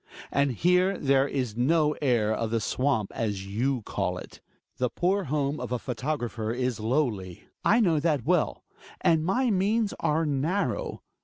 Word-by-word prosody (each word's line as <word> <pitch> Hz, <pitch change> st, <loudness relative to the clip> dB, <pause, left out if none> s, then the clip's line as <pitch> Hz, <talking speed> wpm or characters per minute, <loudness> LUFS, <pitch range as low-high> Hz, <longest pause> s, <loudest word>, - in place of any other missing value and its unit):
And 140 Hz, -2 st, +2 dB
here 180 Hz, -, +2 dB
there 135 Hz, 0 st, +3 dB
is 125 Hz, -6 st, -2 dB
no 150 Hz, +5 st, +3 dB
air 120 Hz, -6 st, +2 dB
of 115 Hz, 0 st, -2 dB
the 115 Hz, 0 st, 0 dB
swamp 125 Hz, -1 st, 0 dB
as 100 Hz, -4 st, -2 dB
you 120 Hz, +5 st, -1 dB
call 90 Hz, -3 st, -2 dB
it. -, -, -11 dB, 0.4 s
The 125 Hz, -1 st, 0 dB
poor 190 Hz, +6 st, 0 dB
home 145 Hz, 0 st, -1 dB
of 125 Hz, -, -5 dB
the 125 Hz, -, 0 dB
photographer 120 Hz, -3 st, -3 dB
is 125 Hz, -1 st, -1 dB
lowly 110 Hz, -, -1 dB
— -, -, -55 dB
I 235 Hz, +3 st, +4 dB
know 170 Hz, -7 st, +3 dB
that 145 Hz, -6 st, 0 dB
well -, -, +1 dB, 0.2 s
— -, -, -18 dB, 0.2 s
and 160 Hz, -2 st, +3 dB
my 240 Hz, +8 st, +1 dB
means 205 Hz, +3 st, +1 dB
are 160 Hz, +2 st, +1 dB
narrow. 180 Hz, -, -1 dB
135 Hz, 170 wpm, -27 LUFS, 115-165 Hz, 0.4 s, I